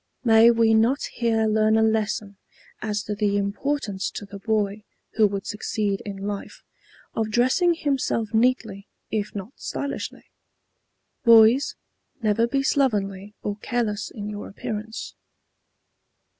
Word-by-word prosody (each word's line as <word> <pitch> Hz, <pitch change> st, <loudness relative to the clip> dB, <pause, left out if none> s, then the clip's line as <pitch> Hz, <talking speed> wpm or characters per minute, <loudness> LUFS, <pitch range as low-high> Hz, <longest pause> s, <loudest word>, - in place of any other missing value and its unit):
May 225 Hz, -1 st, +7 dB
we 230 Hz, -1 st, +4 dB
not 235 Hz, +6 st, +3 dB
here 225 Hz, -2 st, +1 dB
learn 215 Hz, 0 st, +3 dB
a 220 Hz, -, +4 dB
lesson 215 Hz, -2 st, 0 dB, 0.4 s
as 210 Hz, -1 st, -2 dB
to 210 Hz, -, -3 dB
the 205 Hz, -1 st, +1 dB
importance 205 Hz, 0 st, -2 dB
to 205 Hz, -, -7 dB
the 200 Hz, 0 st, -10 dB
boy 210 Hz, -1 st, -1 dB, 0.3 s
who 220 Hz, -1 st, +4 dB
would 200 Hz, -1 st, -4 dB
succeed 210 Hz, -1 st, -2 dB
in 200 Hz, -1 st, -5 dB
life, 205 Hz, -1 st, -6 dB, 0.5 s
of 220 Hz, -1 st, -1 dB
dressing 255 Hz, -, +3 dB
himself 265 Hz, -7 st, -1 dB
neatly 220 Hz, -4 st, +1 dB, 0.2 s
if 210 Hz, -1 st, -2 dB
not 200 Hz, +3 st, -6 dB
stylishly. 280 Hz, 0 st, -5 dB, 0.9 s
Boys, 230 Hz, +3 st, +6 dB, 0.4 s
never 230 Hz, 0 st, +2 dB
be 275 Hz, +3 st, 0 dB
slovenly 205 Hz, -7 st, 0 dB
or 205 Hz, -1 st, -3 dB
careless 215 Hz, -3 st, -2 dB
in 205 Hz, -2 st, -7 dB
your 205 Hz, -1 st, -6 dB
appearance. 220 Hz, +2 st, -6 dB
220 Hz, 130 wpm, -24 LUFS, 205-235 Hz, 0.9 s, May